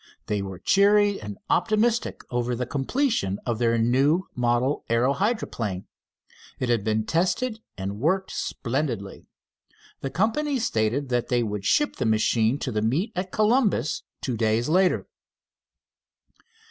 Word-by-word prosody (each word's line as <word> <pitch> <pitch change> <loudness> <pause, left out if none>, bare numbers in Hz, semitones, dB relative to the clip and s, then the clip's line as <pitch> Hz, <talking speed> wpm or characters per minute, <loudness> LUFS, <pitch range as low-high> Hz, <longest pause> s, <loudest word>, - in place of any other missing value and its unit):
They 105 -1 -1
were 95 -2 -6
cheery 205 - +3
and 105 -1 -7
optimistic 230 +1 +1
over 120 0 -1
the 125 +1 -2
completion 140 - 0
of 115 -2 -1
their 115 -1 +2
new 135 +9 +3
model 125 +3 0
aero 120 +4 +3
hydroplane. 125 - -2 0.7
It 125 - -2
had 115 -4 +2
been 110 0 0
tested 215 - 0 0.2
and 100 +1 -4
worked 185 +8 0
splendidly. 120 -6 -3 0.7
The 135 - -3
company 230 - 0
stated 130 - 0
that 120 -1 0
they 120 -1 +1
would 105 -2 -4
ship 295 - +2
the - - 0
machine 110 +3 +2
to 130 - -2
the 105 -2 -1
meet 145 - 0
at 185 +1 -3
Columbus 215 - +2 0.2
two 125 - -2
days 110 +1 +1
later. 185 +3 +2
125 Hz, 135 wpm, -25 LUFS, -, 0.7 s, cheery